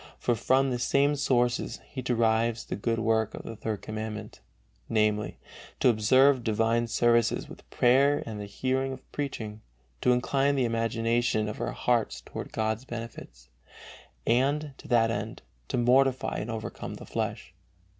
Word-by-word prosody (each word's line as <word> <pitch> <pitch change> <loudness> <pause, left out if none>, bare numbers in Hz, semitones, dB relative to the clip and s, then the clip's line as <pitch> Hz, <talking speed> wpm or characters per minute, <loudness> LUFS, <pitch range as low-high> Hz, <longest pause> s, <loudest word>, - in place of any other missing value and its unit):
From 130 +3 +2
the 120 - -1
same 140 +4 +2
source 125 -3 +1
he 130 - -4
derives 115 -1 +1
the - - -4
good 115 +3 -1
work 110 -1 +1
of - - -8
the 115 - -7
Third 110 -1 -4
Commandment, 110 0 -6 0.5
namely, 105 -1 +1 0.4
"to - - +5
observe 130 +4 +4
divine 115 +2 +1
services 120 0 +2
with - - -13
prayer 135 +4 +3
and 105 -2 -6
the 100 - -6
hearing 130 +5 -1
of 130 - -13
preaching, 110 -7 -4 0.4
to 125 - +4
incline 135 +3 +2
the 130 -2 +2
imagination 115 -1 0
of 105 - -5
our - - -2
hearts 120 -2 0
toward - - -8
God's 110 +1 -1
benefits, 115 - -9 0.8
and, 140 +5 +1
to - - -12
that 115 -2 +3
end, 110 0 -4 0.2
to - - -2
mortify 130 +2 +3
and 105 - -4
overcome 110 -1 -5
the - - -10
flesh." - - -4
115 Hz, 150 wpm, -28 LUFS, 110-130 Hz, 0.8 s, to